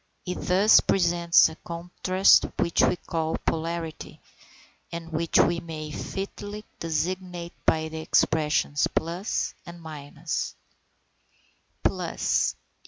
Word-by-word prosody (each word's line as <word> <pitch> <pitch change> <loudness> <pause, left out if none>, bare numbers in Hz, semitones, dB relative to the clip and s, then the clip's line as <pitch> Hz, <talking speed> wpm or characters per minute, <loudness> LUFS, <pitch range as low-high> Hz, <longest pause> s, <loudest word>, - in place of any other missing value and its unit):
It 180 -1 -4
thus 195 +4 +6
presents 170 -2 +4
a 160 - -7
contrast 180 +3 +3
which 170 - +2
we - - +4
call 160 -2 -2
a - - -2
polarity, 165 0 -4 0.7
and 170 0 -6
which 165 +1 +1
we 170 0 +3
may 155 -2 -7
fitly 205 +5 -6
designate 175 +2 -3
by 160 0 +3
the 160 0 -6
expressions 150 -2 +2
plus 175 +5 -1
and 175 -1 -10
minus. 155 0 -5 1.3
_Plus. - - +1
170 Hz, 105 wpm, -26 LUFS, 160-180 Hz, 1.3 s, thus